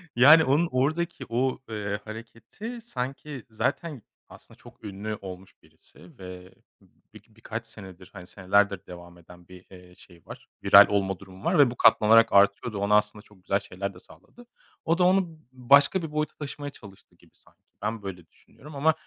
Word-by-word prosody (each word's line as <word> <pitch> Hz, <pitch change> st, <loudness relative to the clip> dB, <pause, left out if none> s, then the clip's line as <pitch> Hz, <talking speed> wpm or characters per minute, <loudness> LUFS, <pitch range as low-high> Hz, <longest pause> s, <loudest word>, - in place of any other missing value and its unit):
Yani, 150 Hz, +6 st, +7 dB
onun 150 Hz, +6 st, +2 dB
oradaki 155 Hz, +7 st, -1 dB
o, 125 Hz, +2 st, -1 dB
eee, 100 Hz, -1 st, -4 dB
hareketi 115 Hz, -, -9 dB
sanki, 135 Hz, -, -6 dB
zaten 140 Hz, +4 st, -3 dB, 0.3 s
aslında -, -, -16 dB
çok -, -, -18 dB
ünlü 105 Hz, +2 st, -5 dB
olmuş 95 Hz, 0 st, -10 dB
birisi -, -, -19 dB
ve 90 Hz, 0 st, -11 dB, 0.6 s
bir -, -, -15 dB
birkaç 115 Hz, +1 st, -8 dB
senedir, 95 Hz, -4 st, -12 dB
hani, 90 Hz, -2 st, -11 dB
senelerdir 100 Hz, 0 st, 0 dB
devam 85 Hz, -1 st, -12 dB
eden 90 Hz, 0 st, -17 dB
bir, 90 Hz, 0 st, -15 dB
eee, 90 Hz, -1 st, -16 dB
şey 85 Hz, -2 st, -19 dB
var, -, -, -12 dB, 0.2 s
viral -, -, +8 dB
olma 95 Hz, -2 st, -1 dB
durumu 95 Hz, 0 st, -14 dB
var -, -, +2 dB
ve 130 Hz, -4 st, +5 dB
bu -, -, -8 dB
katlanarak 115 Hz, +1 st, +5 dB
artıyordu. 100 Hz, +2 st, +3 dB
Ona 105 Hz, +1 st, +3 dB
aslında 105 Hz, 0 st, -2 dB
çok 100 Hz, -4 st, -23 dB
güzel 100 Hz, +1 st, 0 dB
şeyler 100 Hz, 0 st, -6 dB
de 90 Hz, -, -15 dB
sağladı. 95 Hz, -, -19 dB, 0.4 s
O 165 Hz, +2 st, +1 dB
da 180 Hz, -, +2 dB
onu 180 Hz, -3 st, +1 dB
başka 140 Hz, +7 st, +3 dB
bir 160 Hz, -2 st, -6 dB
boyuta 155 Hz, 0 st, -3 dB
taşımaya 145 Hz, 0 st, -7 dB
çalıştı 100 Hz, -7 st, -17 dB
gibi, -, -, -25 dB
sanki. -, -, -27 dB, 0.2 s
Ben 105 Hz, 0 st, -4 dB
böyle 90 Hz, -4 st, -8 dB
düşünüyorum 150 Hz, -, -17 dB
ama, 155 Hz, +3 st, +2 dB
110 Hz, 170 wpm, -26 LUFS, 95-140 Hz, 0.6 s, viral